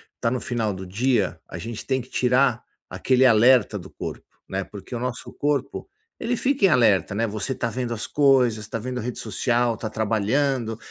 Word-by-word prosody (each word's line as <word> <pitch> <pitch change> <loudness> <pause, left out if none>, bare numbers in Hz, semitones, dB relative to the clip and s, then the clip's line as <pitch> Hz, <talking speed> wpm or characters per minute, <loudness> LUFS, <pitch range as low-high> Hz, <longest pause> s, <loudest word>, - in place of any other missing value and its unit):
está 115 - -1
no 125 - -1
final 115 -4 -1
do 95 0 -7
dia, 110 +1 0
a - - -8
gente 115 -1 -6
tem 130 -1 0
que 125 - -14
tirar 125 -1 +2 0.3
aquele 130 0 +2
alerta 115 -2 +5
do 95 +1 -11
corpo, - - -7 0.2
né. 95 0 -2
Porque 100 +3 -11
o - - -3
nosso 125 0 -4
corpo, 145 - -2 0.3
ele 240 +2 -1
fica 265 -2 +1
em - - +6
alerta, 105 - +3
né. 115 +3 +1
Você 110 +5 -3
está 115 -2 -2
vendo 120 +1 -3
as 115 - -4
coisas, 130 -6 +3
está 110 - -4
vendo 125 +2 -4
rede 120 +1 -5
social, 120 +2 0
está 110 0 -5
trabalhando, 115 +3 0
120 Hz, 195 wpm, -24 LUFS, 110-130 Hz, 0.3 s, em